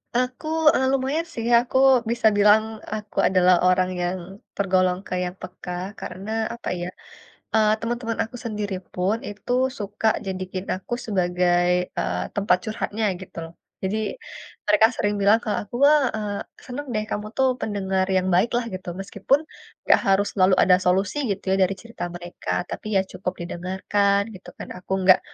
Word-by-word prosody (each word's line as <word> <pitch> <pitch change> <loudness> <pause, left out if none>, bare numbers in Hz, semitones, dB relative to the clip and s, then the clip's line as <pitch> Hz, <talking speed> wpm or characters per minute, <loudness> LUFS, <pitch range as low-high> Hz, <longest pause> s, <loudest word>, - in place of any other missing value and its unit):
Aku, 250 +4 -1 0.3
e - - +2
lumayan 275 +5 0
sih, 230 - -4
aku 245 +2 -1 0.3
bisa 235 -2 +3
bilang 210 +1 +6 0.3
aku 210 -1 -7
adalah 185 -1 +5
orang 185 0 +3
yang 175 +1 -1 0.4
tergolong 185 -2 +2
kayak 180 -1 -1
peka, 180 0 -8 0.3
karena 190 +3 -7 0.2
apa 235 - -6
ya, 175 - -3 0.7
eee, 215 -1 +4
teman-teman 230 0 -3
aku 245 +3 -9
sendiri 210 -3 -3 0.2
pun 185 +4 +1
itu 205 +3 -5 0.3
suka 205 +1 -3 0.2
jadiin 185 0 -4
aku 190 +5 -4
sebagai, 175 -3 +2 0.3
eee, - - -1
tempat 200 -3 +3
curhatnya 220 0 -3 0.2
gitu 185 - -12
loh. 165 +1 -11 0.3
Jadi, 195 +3 -1 0.7
mereka 210 +1 +6
sering 205 0 0
bilang 205 +3 +6
ke 215 - -2
aku, 205 +3 -14
"Wah, 300 0 +6
eee, 210 -1 -3 0.3
senang 280 +3 -6
deh 215 0 0
kamu 210 +1 -3
tuh 265 0 +4
pendengar 190 -2 -1
yang 185 0 +2
baik 185 +7 +3
lah," 240 -1 -1
gitu, 185 -1 -7
meskipun 200 +8 +1 0.5
enggak - - +5
harus 195 +1 +3
selalu 185 -1 +4
ada 180 -1 +6
solusi 190 +7 +1
gitu 195 0 -3
ya - - +2
dari 190 +1 +2
cerita 230 -5 -7
mereka, 175 0 -7 0.2
tapi - - -6
ya - - +5
cukup 185 -1 -4
didengarkan 190 +3 0
gitu 185 - -11
kan, - - -7
aku 180 - -8
enggak 185 0 +6
200 Hz, 160 wpm, -24 LUFS, 185-220 Hz, 0.7 s, bilang